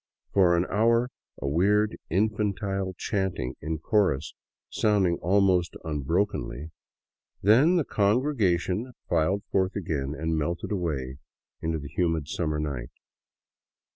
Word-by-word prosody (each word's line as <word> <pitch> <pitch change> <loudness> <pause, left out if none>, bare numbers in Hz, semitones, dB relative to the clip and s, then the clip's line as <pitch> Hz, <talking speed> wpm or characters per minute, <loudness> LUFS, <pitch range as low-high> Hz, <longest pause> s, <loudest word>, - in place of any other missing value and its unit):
For 90 -3 +5
an 85 - +1
hour 115 +4 +2 0.3
a - - -3
weird 105 +8 +2
infantile 100 -1 -1
chanting 95 - -2
in 80 +2 -2
chorus 80 -4 +1 0.3
sounded 95 -5 +1
almost 95 -2 +2
unbrokenly, 80 -1 -2 0.7
then 130 - +5
the 165 -5 +2
congregation 105 -1 +1
filed 90 +4 +1
forth 95 0 +1
again 75 -6 -2
and 80 +1 -1
melted 85 +5 -2
away 70 -9 -2 0.4
into 80 0 -1
the 70 -2 -7
humid 80 -3 0
summer 75 -3 -1
night. 70 -6 -3
90 Hz, 110 wpm, -27 LUFS, 80-105 Hz, 0.7 s, For